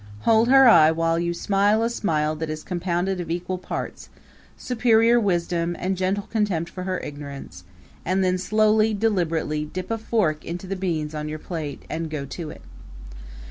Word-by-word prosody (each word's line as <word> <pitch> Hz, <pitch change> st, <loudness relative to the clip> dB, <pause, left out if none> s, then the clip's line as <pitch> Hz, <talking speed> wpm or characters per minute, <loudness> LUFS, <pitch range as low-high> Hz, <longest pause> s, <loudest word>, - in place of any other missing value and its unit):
Hold 225 Hz, 0 st, +4 dB
her 270 Hz, 0 st, +7 dB
eye 160 Hz, -9 st, +7 dB
while 165 Hz, +1 st, +1 dB
you 170 Hz, 0 st, -1 dB
smile 205 Hz, +5 st, +2 dB
a 230 Hz, -, +1 dB
smile 155 Hz, -8 st, 0 dB
that 160 Hz, 0 st, -4 dB
is 155 Hz, 0 st, -5 dB
compounded 180 Hz, +1 st, -2 dB
of 165 Hz, -, -7 dB
equal 180 Hz, +2 st, -3 dB
parts -, -, -6 dB, 0.5 s
superior 235 Hz, -1 st, +3 dB
wisdom, 175 Hz, -4 st, 0 dB
and 190 Hz, +1 st, -1 dB
gentle 190 Hz, +2 st, -1 dB
contempt 195 Hz, -7 st, -1 dB
for 185 Hz, -1 st, -6 dB
her 185 Hz, -1 st, -2 dB
ignorance 140 Hz, -11 st, -8 dB, 0.4 s
and 190 Hz, +2 st, +1 dB
then 185 Hz, 0 st, +1 dB
slowly, 215 Hz, +2 st, +3 dB
deliberately, 165 Hz, -8 st, 0 dB
dip 185 Hz, +6 st, -6 dB
a 225 Hz, -, -1 dB
fork 205 Hz, -9 st, 0 dB
into 175 Hz, +3 st, -6 dB
the 195 Hz, +1 st, -3 dB
beans 165 Hz, -5 st, -2 dB
on 150 Hz, 0 st, -4 dB
your 155 Hz, -, -4 dB
plate 155 Hz, -4 st, -6 dB
and 165 Hz, 0 st, -4 dB
go 150 Hz, -3 st, -4 dB
to 155 Hz, +3 st, -6 dB
it. -, -, -11 dB
180 Hz, 175 wpm, -24 LUFS, 160-205 Hz, 0.5 s, her